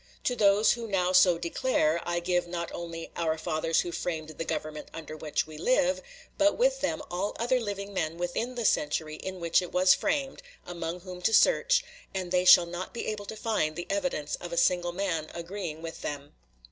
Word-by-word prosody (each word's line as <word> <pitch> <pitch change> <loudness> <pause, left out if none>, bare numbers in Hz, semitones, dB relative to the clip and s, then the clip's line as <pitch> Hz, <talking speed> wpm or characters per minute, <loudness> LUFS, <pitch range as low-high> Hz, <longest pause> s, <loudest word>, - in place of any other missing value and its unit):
To 250 - 0
those 210 0 +5
who 235 -1 -2
now 185 -3 +1
so 185 -2 +6
declare, 170 -2 +1
I 175 0 0
give, 175 0 0
not 170 -1 -4
only 165 -1 -6
"our 160 -2 0
fathers 160 0 0
who 175 - -5
framed 160 -3 -3
the 155 +1 -5
government 155 -1 -4
under 155 -1 -7
which 155 -1 -1
we 155 -1 -10
live," 265 - +2 0.4
but 300 0 +4
with - - +2
them - - -1
all 185 +4 -2
other 250 +2 +2
living 200 -3 -5
men 165 -3 -2
within 175 +8 -2
the 240 -2 -2
century 155 -2 +1
in 190 -1 -6
which 170 0 +3
it 180 - -7
was 185 0 +5
framed, 275 - -1 0.2
among 170 0 -5
whom 180 -1 -9
to 225 - +1
search, - - +4 0.3
and 185 -2 -3
they 180 0 +2
shall 180 -1 +9
not 175 +5 -6
be - - -3
able 210 -1 -4
to 220 - -7
find 210 -9 -1
the 175 - -5
evidence 270 - -2
of 175 - -8
a 170 - -4
single 175 0 +2
man 175 -4 -2
agreeing 170 -2 -5
with 165 0 -7
them. 145 0 -5
175 Hz, 200 wpm, -28 LUFS, 165-205 Hz, 0.4 s, shall